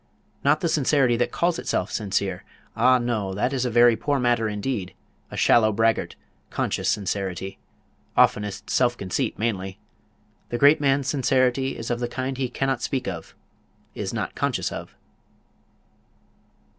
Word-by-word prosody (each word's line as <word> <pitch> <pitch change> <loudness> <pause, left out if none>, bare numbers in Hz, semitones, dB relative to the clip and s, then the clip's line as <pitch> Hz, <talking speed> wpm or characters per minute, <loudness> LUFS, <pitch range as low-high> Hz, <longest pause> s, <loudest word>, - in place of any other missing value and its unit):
Not 145 +2 +3
the 170 - +1
sincerity 140 -5 +3
that 120 - 0
calls 170 0 0
itself 95 - -2
sincere; 95 -3 -2 0.3
ah 130 0 +5
no, 110 -6 -2
that 125 +7 0
is 130 -2 0
a - - 0
very 120 0 +5
poor 145 +4 0
matter 120 -3 +1
indeed; 105 -3 -3 0.3
a - - -8
shallow 110 -2 +4
braggart, 115 +2 +1 0.3
conscious - - -1
sincerity, 95 -2 -2 0.6
oftenest 105 -2 +2
self 120 -2 +2
conceit 100 +6 -2
mainly. 95 -4 -2 0.7
The 120 - -2
great 145 +4 +5
man's 135 -1 +2
sincerity 130 -1 +1
is 115 +1 -4
of 120 - -1
the 120 - -1
kind 130 +2 -3
he 130 -2 -1
cannot 135 0 -1
speak 130 +2 -2
of 85 -4 -6 0.6
is - - -4
not - - -3
conscious - - -1
of." - - -8
120 Hz, 145 wpm, -24 LUFS, 105-135 Hz, 0.7 s, ah